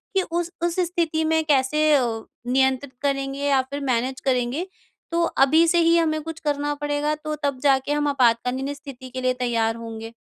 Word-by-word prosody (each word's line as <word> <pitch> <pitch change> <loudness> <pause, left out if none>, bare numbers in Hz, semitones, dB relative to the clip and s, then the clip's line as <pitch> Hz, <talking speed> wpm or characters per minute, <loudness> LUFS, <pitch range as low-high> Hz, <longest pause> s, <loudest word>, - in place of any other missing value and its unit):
कि 385 - +4
उस 345 0 -1
उस 345 -1 0
स्थिति 335 -3 0
में 320 0 +2
कैसे 295 +1 +2
अ, 265 - +3 0.4
नियंत्रित 265 +1 +1
करेंगे 275 -1 -1
या 270 -2 +4
फिर 285 - -3
मैनेज़ 255 +2 -1
करेंगे। 260 +7 0 0.4
तो 340 - +1
अभी 315 +1 +4
से 345 +1 +3
ही 335 0 +4
हमें 310 -2 +1
कुछ 325 +1 -7
करना 290 -1 -1
पड़ेगा 290 +1 -1
तो 305 0 -5
तब 280 -2 -1
जाके 275 0 +3
हम 295 0 0
आपातकालीन 260 +1 +1
स्थिति 270 -3 -10
के 255 +1 -5
लिए 255 0 +2
तैयार 235 -3 0
होंगे। 225 -1 -7
280 Hz, 180 wpm, -23 LUFS, 255-310 Hz, 0.4 s, कि